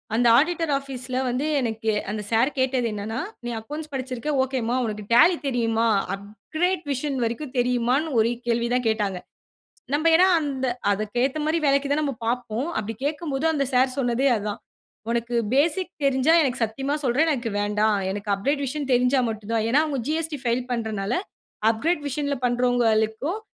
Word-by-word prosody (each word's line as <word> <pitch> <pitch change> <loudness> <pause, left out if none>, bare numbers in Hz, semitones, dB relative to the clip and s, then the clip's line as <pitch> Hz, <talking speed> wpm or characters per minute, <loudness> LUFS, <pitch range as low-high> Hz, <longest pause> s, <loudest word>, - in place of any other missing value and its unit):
அந்த 240 +1 +3
ஆடிட்டர் 330 0 0
ஆஃபீஸ்ல 255 -2 -5
வந்து 255 +5 -1
எனக்கு 225 -2 -1 0.2
அந்த 210 0 -3
சார் 235 +5 +3
கேட்டது 255 -2 +1
என்னென்னா, 215 +4 -4 0.3
நீ - - -2
அக்கவுண்ட்ஸ் 300 +6 -7
படிச்சிருக்க 260 +2 -3
ஓகேம்மா. 255 -3 -1
உனக்கு 210 -1 -4
Tally 335 +9 +6
தெரியுமா? 230 -2 +1 0.3
அப்கிரேட் 315 - -3
வெர்ஷன் 275 +1 -2
வரைக்கும் 250 +4 -4
தெரியுமான்னு, 250 +5 +1
ஒரே 230 +2 +1
கேள்விதான் 235 +1 +1
கேட்டாங்க. 205 -4 -1 0.7
நம்ப 310 +3 +2
ஏன்னா 365 +3 +6
அந்த 270 -4 -2 0.2
அதுக்கு 215 +3 -3
ஏத்த 275 +3 -2
மாரி 320 +2 +1
வேலைக்கு 280 0 +2
தான் 300 - +2
நம்ப 280 - -1
பார்ப்போம். 240 +3 -2
அப்படி 220 +1 -3
கேட்கும்போது 295 -1 -2
அந்த 280 - +1
சார் 255 +1 +4
சொன்னதே 250 +1 +1
அதான். 210 -1 -4 0.5
"உனக்கு 235 +1 -1 0.2
பேசிக் 335 +5 +2
தெரிஞ்சா, 275 +4 +3
எனக்கு 255 -3 -1
சத்தியமா 270 +6 -3
சொல்றேன், 290 +7 +2
எனக்கு 240 -5 -2
வேண்டாம். 210 0 +1
எனக்கு 205 +1 -5
அப்கிரேட் 280 +8 -1
வெர்ஷன் 280 +1 -4
தெரிஞ்சா 250 +2 +3
மட்டும் 220 0 -6
தான்." 220 -1 +1
ஏன்னா 290 +3 +5
அவுங்க 280 -4 -2
ஜி.எஸ்.டி. 315 -2 -1
ஃபைல் 240 +1 0
பண்றதுனால, 220 -3 -2 0.6
"அப்கிரேட் 300 +8 -1
வெர்ஷன்ல 285 0 -2
பண்ணுறவங்களுக்கும், 245 - +1
250 Hz, 155 wpm, -24 LUFS, 225-285 Hz, 0.7 s, Tally